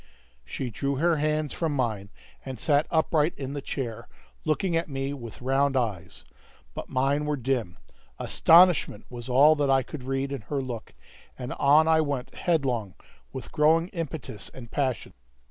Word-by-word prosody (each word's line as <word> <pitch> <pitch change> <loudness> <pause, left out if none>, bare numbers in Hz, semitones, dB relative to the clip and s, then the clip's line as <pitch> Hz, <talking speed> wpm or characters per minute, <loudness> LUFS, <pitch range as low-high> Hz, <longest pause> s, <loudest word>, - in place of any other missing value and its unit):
She 125 - -5
drew 140 +4 -2
her 165 +3 +2
hands 150 0 0
from 160 -4 -1
mine, 110 -7 -2 0.3
and 130 -3 -7
sat 145 +3 +2
upright 160 -1 +2
in 135 0 -5
the 145 - -4
chair, 120 -5 -5 0.4
looking 165 +3 0
at 165 -1 -1
me 135 0 -3
with 120 -3 -9
round 135 +1 +2
eyes; 100 -8 -3 0.5
but - - -7
mine 140 +3 +1
were 150 -1 -1
dim; 120 -8 -2 0.4
astonishment 165 - +4
was 120 0 -8
all 145 +5 +6
that 145 -1 +1
I 135 -1 +4
could 140 -1 -8
read 135 +1 -2
in 140 -4 -4
her 145 - -1
look, 125 -4 -6 0.4
and 125 0 -5
on 150 +3 +4
I 160 -1 +4
went 140 -4 -3
headlong, 125 - -1 0.4
with 130 - -8
growing 165 +3 +3
impetus 160 - -6
and 120 -3 -10
passion. 130 -5 -2
140 Hz, 165 wpm, -26 LUFS, 125-155 Hz, 0.5 s, all